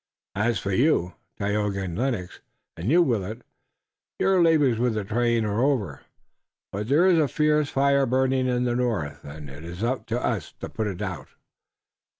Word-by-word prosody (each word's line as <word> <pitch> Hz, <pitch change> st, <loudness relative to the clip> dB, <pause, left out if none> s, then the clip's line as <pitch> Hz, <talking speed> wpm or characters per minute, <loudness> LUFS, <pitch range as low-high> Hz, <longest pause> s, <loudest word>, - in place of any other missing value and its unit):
As 110 Hz, +4 st, +1 dB
for 100 Hz, -, -3 dB
you, 95 Hz, -, +2 dB, 0.2 s
Tayoga 100 Hz, -1 st, -1 dB
and 90 Hz, -3 st, -4 dB
Lennox, 110 Hz, -5 st, -2 dB, 0.4 s
and 85 Hz, +7 st, -3 dB
you, 175 Hz, +4 st, +5 dB
Willet, 115 Hz, -, -2 dB, 0.7 s
your 190 Hz, -2 st, +3 dB
labors 150 Hz, -8 st, +3 dB
with 120 Hz, -2 st, +1 dB
the 105 Hz, -, -1 dB
train 115 Hz, +2 st, +1 dB
are 105 Hz, +2 st, 0 dB
over. 110 Hz, -, 0 dB, 0.7 s
But 105 Hz, +2 st, -4 dB
there 155 Hz, +6 st, +4 dB
is 180 Hz, -3 st, +5 dB
a 150 Hz, -, +3 dB
fierce 150 Hz, +1 st, +1 dB
fire 140 Hz, 0 st, +2 dB
burning 130 Hz, +1 st, +1 dB
in 125 Hz, -1 st, +1 dB
the 120 Hz, -1 st, 0 dB
north, 115 Hz, -12 st, -2 dB
and 75 Hz, +1 st, -9 dB
it 70 Hz, +3 st, -11 dB
is 85 Hz, +3 st, -8 dB
for 120 Hz, -1 st, -1 dB
us 110 Hz, -9 st, -2 dB
to -, -, -6 dB
put 110 Hz, -, -3 dB
it 100 Hz, 0 st, -4 dB
out. 90 Hz, -5 st, -5 dB
115 Hz, 170 wpm, -25 LUFS, 100-135 Hz, 0.7 s, you